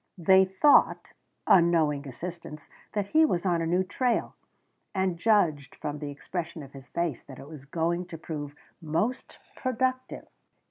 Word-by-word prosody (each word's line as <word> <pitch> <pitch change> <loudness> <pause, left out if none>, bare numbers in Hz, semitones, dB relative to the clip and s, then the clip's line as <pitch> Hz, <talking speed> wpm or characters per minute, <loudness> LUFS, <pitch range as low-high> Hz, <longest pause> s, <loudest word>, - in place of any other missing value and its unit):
They 190 +2 +5
thought 190 +10 +3 0.3
unknowing 160 -5 +3
assistants 160 +3 -8 0.2
that 205 -2 -2
he 315 +1 +5
was 180 - +1
on 175 -2 +1
a 165 - -1
new 180 +3 +2
trail, 245 +5 -1 0.6
and 190 -2 0
judged 170 - +1
from 150 0 -5
the 145 -1 -5
expression 160 +2 -6
of 135 - -13
his 135 -1 -12
face 170 -7 -2
that 135 -2 -13
it 140 - -11
was 150 -3 -11
going 170 +4 -1
to 165 - -8
prove 145 -3 -6 0.3
most 165 +11 -2 0.2
productive. 255 0 -2
170 Hz, 150 wpm, -27 LUFS, 150-190 Hz, 0.6 s, They